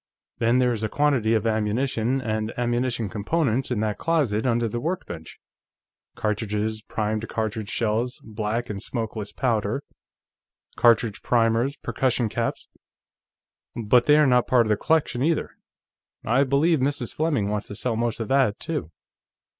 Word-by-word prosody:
Then, 115 +2 +3
there 125 -1 +3
is 110 - -4
a 110 - -1
quantity 130 -6 +2
of 110 0 0
ammunition 115 +3 0
and 110 -2 -2
ammunition 120 -1 0
components 130 - 0
in 120 -4 -1
that 105 -1 -1
closet 130 -9 +1
under 120 -1 +1
the 120 +2 -3
workbench 120 - -5 0.8
cartridges, 105 0 -2
primed 110 +1 -3
cartridge 110 -1 -3
shells, 115 +3 -1
black 110 +2 -3
and 100 -3 -5
smokeless 110 -3 -4
powder, 115 +1 -1 0.9
cartridge 115 -3 +3
primers, 120 +3 +2
percussion 125 -3 0
caps - - -3 1.1
but 120 +1 +3
they 150 0 +7
are 150 - +5
not 125 -2 +3
part 120 -2 +4
of - - -3
the 105 - +4
collection, 155 -2 +1
either. 160 +3 +1 0.7
I 135 +5 +3
believe 145 +4 +3
Mrs. 135 -2 -1
Fleming 145 -10 0
wants 105 0 -2
to 105 - -7
sell 120 +2 -1
most 115 0 -1
of 115 - -3
that, 135 -5 +2
too." 150 - -4
115 Hz, 145 wpm, -24 LUFS, 110-130 Hz, 1.1 s, they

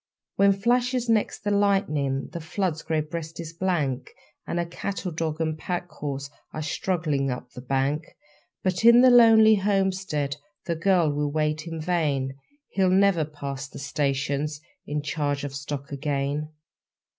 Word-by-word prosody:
When 200 0 +5
flashes 245 +4 +1
next 220 -3 +1
the 205 - 0
lightning, 155 -10 +1
The 170 - -5
flood's 165 0 -2
grey 160 -1 0
breast 160 +1 -6
is 165 -1 -6
blank, 155 -8 -1 0.4
And 175 - -1
a 170 - 0
cattle 185 +2 -4
dog 160 -1 -2
and 160 -1 0
pack 175 +2 -4
horse 140 -2 -5 0.2
Are 155 - -4
struggling 150 -2 -1
up 125 0 -5
the 125 - -9
bank. 135 +4 -1 0.5
But 185 +1 0
in 235 +1 +8
the 255 0 +7
lonely 220 -2 +7
homestead 190 -7 0 0.3
The 170 - -1
girl 170 -2 +3
will 145 0 -1
wait 155 +1 -1
in 165 -1 -5
vain 150 -6 0 0.4
He'll 190 -2 +2
never 190 -4 +4
pass 140 -2 -6
the - - -11
stations 140 +1 -1 0.3
In 150 0 -2
charge 145 -1 -1
of 145 -1 -4
stock 140 +1 -5
again. 145 +1 -2
155 Hz, 155 wpm, -26 LUFS, 145-190 Hz, 0.5 s, in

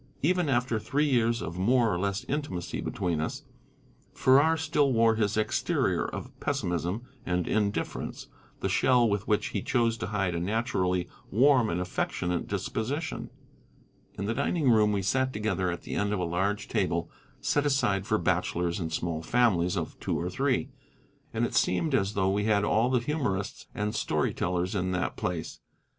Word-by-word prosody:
Even 175 0 +2
after 120 -3 +1
three 145 +7 0
years 120 -3 +2
of 85 +2 -5
more 115 +2 +3
or 85 - -1
less 100 +1 -1
intimacy 135 - -3
between 85 -5 -1
us, 80 - -4 0.7
Farrar 145 +5 +5
still 145 -2 +2
wore 115 -2 +4
his 105 -2 0
exterior 110 - +1
of - - -6
pessimism 90 +6 -1 0.2
and 90 -1 -1
indifference, 105 -1 -2 0.4
the - - 0
shell 125 -2 +4
with 100 -1 -1
which 105 -1 +1
he - - -2
chose 115 -3 +1
to 90 - -4
hide 95 -4 -1
a 85 - -1
naturally 95 -2 0 0.2
warm 125 0 +4
and 85 - -1
affectionate 90 -1 -2
disposition. 110 - -3 0.9
In 100 - -3
the 110 - 0
dining 140 +2 +1
room 105 -2 +4
we 100 -2 0
sat 130 +7 +1
together 105 -4 -1
at 85 0 -4
the - - -6
end 105 0 0
of 105 - -1
a - - 0
large 95 +5 -1
table 85 0 -1 0.3
set 145 0 +1
aside 100 -8 +1
for 110 - +2
bachelors 90 -2 0
and 80 -3 -3
small 80 -1 -2
families 90 -3 +2
of - - -4
two - - -1
or - - -3
three, - - 0 0.6
and - - 0
it - - -4
seemed 140 - +1
as 100 -4 +1
though 95 -1 +2
we 105 +1 0
had 105 -2 +3
all 110 +4 +2
the 130 - +3
humorists 120 -8 -2
and 105 0 -1
story 110 - 0
tellers 90 0 -1
in 95 -2 -1
that 90 0 -1
place. 85 -2 -4
105 Hz, 175 wpm, -28 LUFS, 90-120 Hz, 0.9 s, Farrar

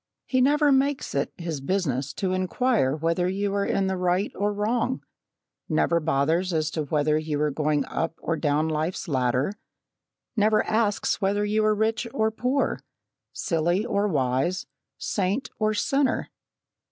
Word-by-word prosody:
"He 255 -1 +1
never 290 +2 +4
makes 275 +1 +1
it 140 0 -1
his 165 -5 -4
business 140 -6 -1
to 185 -2 -1
inquire 185 - +1
whether 165 +3 0
you 200 +1 -1
are 200 0 +1
in 195 - +1
the 190 0 -1
right 180 +3 +1
or 205 +1 0
wrong 225 +5 -1 0.7
never 170 - +2
bothers 160 +4 +1
as 155 -1 0
to 155 -1 -2
whether 150 +1 +1
you 155 -2 -2
are 150 0 +1
going 150 -1 0
up 165 0 -2
or 165 - -2
down 150 0 +1
life's 160 +4 -2
ladder 130 +3 +1 0.8
never 215 0 +3
asks 215 -2 0
whether 205 +1 +1
you 215 +1 +1
are 215 0 +3
rich 220 +3 0
or 220 0 +2
poor, 250 +5 0 0.5
silly 175 +5 0
or 205 -3 +1
wise, 140 +2 0 0.3
saint 205 +6 -1
or 215 0 +1
sinner. 270 +6 0
185 Hz, 155 wpm, -25 LUFS, 155-215 Hz, 0.8 s, never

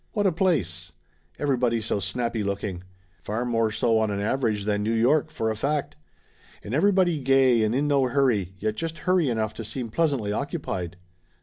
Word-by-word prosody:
What 205 -2 0
a 190 - +4
place! 95 - -1 0.4
Everybody 125 -5 +1
so 110 -2 -2
snappy 115 +2 -2
looking. 100 -2 -3 0.4
Far 110 +4 -3
more 115 -2 +1
so 110 +1 +1
on 110 -1 +1
an 100 -1 -2
average 110 -1 0
than 105 -1 0
New 110 +2 0
York, 140 +7 +3
for 110 -6 -2
a - - -3
fact. 140 - -2 0.7
And 105 - -6
everybody 180 0 +3
gay 130 -3 +4
and 110 +2 +1
in 145 +3 +1
no 140 -2 +3
hurry, 120 -8 +1
yet 110 +3 -1
just 165 +5 -4
hurry 180 -6 +3
enough 110 -2 -1
to 115 - -6
seem 115 +2 -5
pleasantly 140 -9 0
occupied. 95 - -4
115 Hz, 180 wpm, -25 LUFS, 105-140 Hz, 0.7 s, a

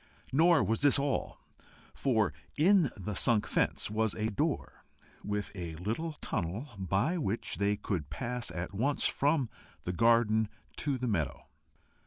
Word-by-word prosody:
Nor 165 +4 +5
was 110 0 0
this 145 0 +5
all, 140 -1 -1 0.5
for 115 -6 +1 0.2
in 175 -1 +5
the 105 +1 -4
sunk 105 +2 +3
fence - - 0
was 110 -1 0
a 110 +1 -1
door 100 - -2 0.4
with 105 -1 -2
a 85 -4 -5
little 115 - -3
tunnel, 105 - -3
by 100 - +1
which 115 -6 -2
they 100 +1 +1
could 85 -10 -3
pass 125 -1 -3
at 90 +2 -5
once 135 +8 0
from 145 -2 +2 0.4
the 90 - -2
garden 110 0 +4 0.3
to 140 -3 0
the 125 0 -2
meadow. 80 - -1
110 Hz, 145 wpm, -31 LUFS, 100-140 Hz, 0.5 s, Nor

